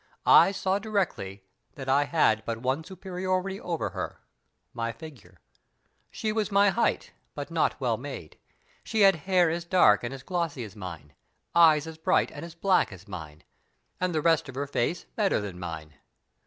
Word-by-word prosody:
I - - +7
saw 190 0 0
directly 185 - -2 0.3
that 135 -2 -8
I 140 +2 +3
had 110 -9 +2
but 115 -1 -3
one 130 +6 -1
superiority 185 +1 -3
over 170 -3 -3
her - - -5 0.5
my 115 0 -2
figure. 115 - -13 0.7
She 215 - -3
was 215 -1 -1
my 200 +1 +5
height, 230 +4 0 0.2
but - - -6
not - - +1
well - - 0
made. - - -8 0.4
She 220 -1 -1
had 195 -2 +7
hair 180 -3 +4
as 170 +1 -3
dark 170 - +4
and 120 - -3
as 135 -1 -8
glossy 165 -6 -2
as 105 -1 -10
mine; 85 -7 -9 0.4
eyes 160 -3 +6
as 160 0 -9
bright 185 +3 +2
and - - -8
as 170 0 -9
black 185 - +2
as 95 +2 -12
mine; 80 -5 -9 0.6
and 185 0 0
the 155 - +1
rest 165 -4 +3
of 130 - -9
her 140 +2 -2
face 145 +5 -1
better 205 -3 +2
than 100 -4 -6
mine. 80 -3 -7
160 Hz, 175 wpm, -27 LUFS, 110-185 Hz, 0.7 s, I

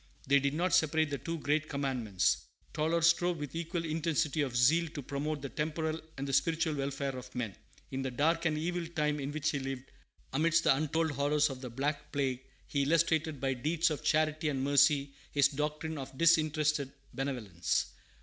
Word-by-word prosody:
They 140 +1 +5
did 140 +1 0
not 175 +2 0
separate 155 -1 +3
the 140 - -2
two 165 +6 -4
great 150 +1 0
commandments. 125 -9 0 0.3
Tauler 160 +2 +1
strove 170 +1 +3
with 145 -2 -6
equal 165 0 -3
intensity 155 -2 0
of 130 -4 -1
zeal 160 +8 +4
to 145 - -4
promote 145 +2 -3
the 140 - -4
temporal 155 +2 -2 0.2
and 135 +1 -3
the 135 - -3
spiritual 165 +2 +2
welfare 140 -1 -2
of 125 0 -9
men. 115 -6 -3 0.4
In 135 - -2
the 130 - -2
dark 160 +6 +1
and 155 -1 +1
evil 170 +2 -2
time 150 -3 -1
in 140 0 -3
which 155 0 0
he 145 - -2
lived, 135 -1 -5 0.4
amidst 165 +4 +3
the - - +5
untold 155 +2 0
horrors 145 +1 +2
of 130 -1 -8
the 125 - -6
"Black 145 +4 -3
Plague," 130 -3 -1 0.2
he 140 - -1
illustrated 160 0 +2
by 135 0 0
deeds 155 +6 +1
of 150 - -4
charity 155 0 +2
and 135 -2 -1
mercy 140 0 +4 0.2
his 140 -1 +5
doctrine 150 +2 -3
of 135 0 -8
disinterested 155 -3 +3 0.2
benevolence. 115 -11 -1
150 Hz, 185 wpm, -32 LUFS, 135-160 Hz, 0.4 s, They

